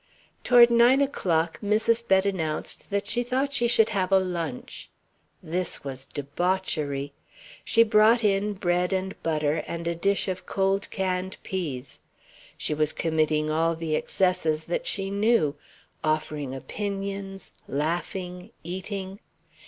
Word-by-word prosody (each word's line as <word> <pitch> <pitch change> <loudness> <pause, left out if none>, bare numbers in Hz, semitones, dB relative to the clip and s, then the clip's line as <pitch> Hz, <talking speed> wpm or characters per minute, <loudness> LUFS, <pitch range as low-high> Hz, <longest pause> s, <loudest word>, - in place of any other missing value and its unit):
Toward 240 -1 +7
nine 240 +3 +6
o'clock 170 - 0
Mrs. 225 +3 +2
Bett 190 0 +4
announced 160 -6 -2
that 200 0 -1
she 235 +4 +2
thought 260 +3 -1
she 240 -3 +3
should 225 -2 +5
have 195 -3 -1
a 195 - +7
lunch. 170 -8 -4 0.5
This 180 +2 -2
was 135 -1 -6
debauchery. 145 -2 -2 0.5
She 230 - +5
brought 225 +1 +4
in 205 0 +2
bread 180 -1 0
and 190 0 -3
butter, 155 -1 0
and 170 0 -4
a 170 - +1
dish 195 +5 +1
of 185 -1 -4
cold 195 0 0
canned 185 0 -2
peas. 145 -9 -5 0.6
She - - -2
was 155 0 0
committing 155 -1 +1
all 165 +1 +1
the 160 -1 -3
excesses 165 -4 +1
that 175 - -3
she 195 -1 -1
knew 200 -8 +2 0.5
offering 155 -3 -1
opinions, 195 +3 -5 0.2
laughing, 180 +5 -3
eating. 190 +2 -5
185 Hz, 130 wpm, -26 LUFS, 160-200 Hz, 0.6 s, Toward